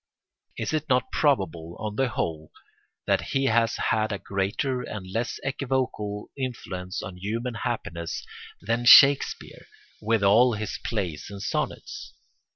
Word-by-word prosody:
Is - - -3
it 155 -1 -1
not 125 -2 +2
probable, 85 - 0
on 105 -1 -4
the 135 +3 +2
whole, 80 -7 -3 0.5
that - - +2
he 135 0 -1
has 115 -2 +3
had 110 0 0
a 100 - -1
greater 100 +7 -2
and 105 -5 -6
less 115 +6 -3
equivocal 130 -7 -2
influence 95 -9 -5
on 95 -3 -7
human 115 +6 -3
happiness 95 -9 -4 0.3
than 115 +4 -1
Shakespeare 140 +3 +6 0.3
with 110 -1 +1
all 115 +5 +5
his 105 -2 -4
plays 90 -9 -3
and 100 -1 -8
sonnets? - - -4
110 Hz, 135 wpm, -26 LUFS, 100-125 Hz, 0.5 s, Shakespeare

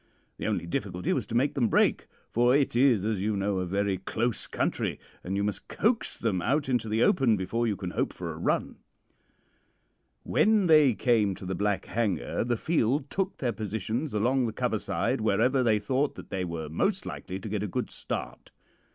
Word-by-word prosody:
The - - -3
only - - -1
difficulty 90 +1 -2
was - - -2
to 115 - -4
make 130 +5 +2
them 125 -5 +2
break, - - +2 0.2
for 120 +2 +4
it 140 -4 +2
is, 120 -6 +4
as 110 -3 -1
you 105 0 0
know, 100 -1 0
a 90 - -2
very 100 0 0
close 115 +4 -2
country, - - -1 0.2
and 95 +2 -3
you 100 - 0
must 105 0 -3
coax 225 +2 0
them 100 -6 -1
out 140 - +1
into 120 -4 0
the 110 +2 +2
open 125 - +3
before 115 +6 -1
you 105 - 0
can 95 -2 -5
hope - - -1
for - - -6
a - - -9
run. - - -1 1.5
"When 215 -2 +3
they 155 -7 +6
came 110 -6 +2
to 95 - -10
the 95 - -2
Black 100 +2 -1
Hanger 105 - -1
the 120 0 0
field 140 -2 0
took 195 0 -2
their 120 -3 -1
positions 110 +7 -3
along 120 +4 +1
the 110 - -4
cover - - -1
side - - -1
wherever 115 +5 +2
they 115 -4 +3
thought 130 +7 0
that - - -11
they 95 -1 -1
were 85 -2 -4
most 180 - 0
likely 95 +1 -6
to 110 - -7
get 105 -1 -2
a 105 - -2
good - - -3
start. - - -5
110 Hz, 200 wpm, -28 LUFS, 100-130 Hz, 1.5 s, they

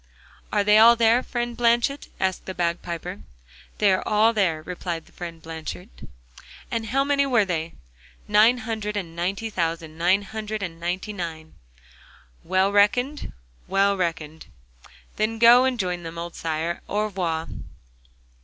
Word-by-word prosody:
'Are 205 - +2
they 210 +1 +5
all 230 +2 +8
there, 230 +1 +4
friend 240 -2 -3
Blanchet?' 240 +4 +1
asked 190 -1 -1
the 190 - -5
bagpiper. 170 +2 -3 0.6
'They 205 -2 +4
are 185 - 0
all 220 +2 +4
there,' 170 -7 0
replied 175 -1 -5
friend 170 -2 -8
Blanchet. 160 - -7 0.8
'And 230 -1 -2
how 270 +5 +1
many 280 0 +2
were 240 -6 +3
they?' 165 -3 -3 0.5
'Nine 215 +4 +5
hundred 220 -3 -4
and 170 -5 -5
ninety 195 +6 -2
thousand, 165 -3 -3
nine 185 +4 +3
hundred 215 0 -5
and 165 -3 -6
ninety 180 +5 -3
nine.' 160 -4 -6 0.9
'Well 190 +2 +2
reckoned?' 245 +8 +2 0.4
'Well 200 +1 +2
reckoned.' 160 -4 -4 0.7
'Then 220 +1 0
go 240 +2 +7
and 260 -1 0
join 180 -2 -2
them, 165 0 -8
old 170 0 -5
sire, 160 +1 -2
and 170 - -7
au 210 +1 0
revoir. 175 -6 -2
195 Hz, 145 wpm, -24 LUFS, 170-225 Hz, 0.9 s, all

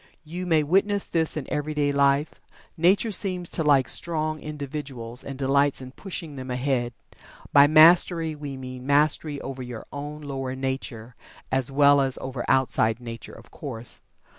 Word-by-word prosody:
You 175 +4 -6
may 160 -3 +3
witness 195 +5 +2
this 160 -2 0
in 145 - -4
everyday 150 -1 0
life 140 +1 +1 0.3
Nature 190 +7 +3
seems 180 -2 0
to 160 - -1
like 140 -4 +4
strong 155 -2 -2
individuals, 140 -5 -6
and 135 -1 -7
delights 140 +1 +2
in 130 -1 -9
pushing 165 -3 -7
them 130 0 -7
ahead. 125 -1 -1 0.6
By 140 0 +8
Mastery, 165 +1 +5
we 145 -2 -7
mean 130 0 -8
mastery 145 0 +2
over 135 -1 -6
your 125 -3 -7
own 145 +1 -6
lower 135 -2 -4
nature, 130 -3 -5 0.4
as 130 0 0
well 140 0 +5
as 135 -1 0
over 130 -2 -5
outside 115 -3 +2
nature, 115 -2 -8
of 115 - -15
course. 120 -5 -7
140 Hz, 155 wpm, -25 LUFS, 130-155 Hz, 0.6 s, By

